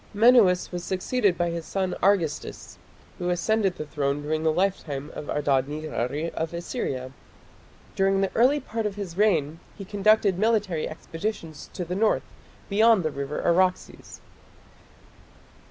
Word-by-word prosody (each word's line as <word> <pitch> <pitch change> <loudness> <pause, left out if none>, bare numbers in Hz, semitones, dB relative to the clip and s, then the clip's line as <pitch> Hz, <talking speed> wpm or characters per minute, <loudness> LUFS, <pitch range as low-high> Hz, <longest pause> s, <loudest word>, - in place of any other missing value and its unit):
Menuas 215 -5 +5
was 175 -1 -4
succeeded 190 +2 0
by 175 -1 0
his 170 -1 -4
son 190 +1 -2
Argistis, 180 -6 0 0.4
who 175 - -1
ascended 190 +2 +1
the 155 - -5
throne 145 -1 -2
during 155 +1 -1
the 160 0 +2
lifetime 155 -5 -2
of 150 - -7
Adad 140 -3 +1
nirari 150 0 -3
of 160 +1 -3
Assyria. 135 - -4 0.8
During 195 0 +2
the 195 - 0
early 260 +6 +4
part 225 -4 -3
of 200 - -6
his 195 -5 -6
reign 165 -7 +2 0.2
he 195 - -7
conducted 205 -1 +2
military 210 -7 +1
expeditions 165 0 -6
to 180 - -4
the 175 - -4
north 215 +2 +2 0.4
beyond 215 -1 +4
the 155 - -1
river 140 +1 -4
Araxes. 180 +1 0
180 Hz, 140 wpm, -25 LUFS, 155-205 Hz, 0.8 s, Menuas